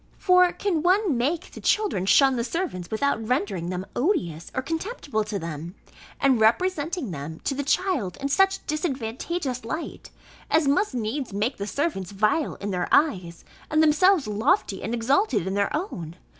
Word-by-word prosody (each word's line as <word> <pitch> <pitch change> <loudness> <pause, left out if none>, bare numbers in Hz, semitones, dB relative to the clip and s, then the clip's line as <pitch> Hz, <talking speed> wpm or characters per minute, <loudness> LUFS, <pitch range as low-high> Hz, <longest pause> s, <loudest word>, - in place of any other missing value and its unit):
For 365 -1 +5
can 350 -6 -1
one 370 -1 +3
make 295 +9 -1
the - - -10
children 400 - +1
shun 270 +4 +5
the 235 - -1
servants 240 - -3
without 225 +1 0
rendering 200 -7 -1
them 185 +1 -4
odious 180 - -1
or 260 - -1
contemptible 320 - -3
to 210 -1 -3
them, 165 +1 -6 0.4
and 265 -5 +3
representing 315 - +1
them 160 +2 -6
to - - 0
the 280 - -2
child 285 - 0
in 275 - -2
such 385 +6 +2
disadvantageous 270 -1 -3
light, 315 +9 -6 0.4
as 315 -2 +3
must 285 +3 +1
needs 240 +1 -3
make 220 +6 -1
the 200 - -4
servants 210 - -2
vile 215 +10 +1
in 205 0 -5
their 180 -1 -1
eyes, 180 - +1 0.2
and 310 +1 +3
themselves 315 +1 +4
lofty 215 - +1
and 225 +5 -2
exalted 265 - +1
in 190 - -2
their 200 0 +1
own? 175 - -5
260 Hz, 165 wpm, -25 LUFS, 200-330 Hz, 0.4 s, For